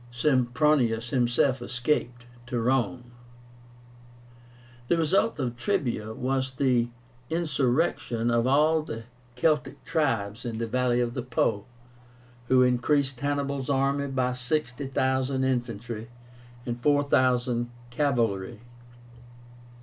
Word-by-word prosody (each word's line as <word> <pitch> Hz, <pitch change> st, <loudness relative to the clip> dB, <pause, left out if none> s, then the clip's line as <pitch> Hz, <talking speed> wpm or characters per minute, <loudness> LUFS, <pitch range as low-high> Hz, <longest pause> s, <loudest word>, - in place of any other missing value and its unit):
Sempronius 125 Hz, -2 st, +2 dB
himself 125 Hz, +1 st, +2 dB
escaped 125 Hz, -1 st, -1 dB, 0.2 s
to 120 Hz, -1 st, -2 dB
Rome. 120 Hz, -1 st, 0 dB, 1.8 s
The 170 Hz, -, +2 dB
result 190 Hz, +8 st, +2 dB
of 125 Hz, -4 st, -2 dB
TREBIA 120 Hz, -, -2 dB
was 130 Hz, +1 st, -1 dB
the 125 Hz, -3 st, +2 dB, 0.4 s
insurrection 135 Hz, -6 st, 0 dB
of 120 Hz, +1 st, +2 dB
all 155 Hz, +4 st, +4 dB
the 115 Hz, -7 st, -7 dB, 0.3 s
Celtic 150 Hz, +4 st, 0 dB
tribes 115 Hz, -9 st, -1 dB
in 115 Hz, -2 st, -4 dB
the 115 Hz, -, -1 dB
valley 125 Hz, +1 st, +1 dB
of 120 Hz, -1 st, -1 dB
the 125 Hz, -, -3 dB
Po, 115 Hz, -4 st, 0 dB, 0.8 s
who 130 Hz, 0 st, +5 dB
increased 130 Hz, +1 st, +1 dB
Hannibal's 140 Hz, -1 st, -2 dB
army 140 Hz, +1 st, +1 dB
by 130 Hz, -2 st, 0 dB
60,000 130 Hz, 0 st, -1 dB
infantry 120 Hz, -3 st, -2 dB, 0.6 s
and 120 Hz, 0 st, -4 dB
4,000 130 Hz, -4 st, +2 dB, 0.2 s
cavalry. 115 Hz, -6 st, 0 dB
125 Hz, 100 wpm, -27 LUFS, 120-140 Hz, 1.8 s, who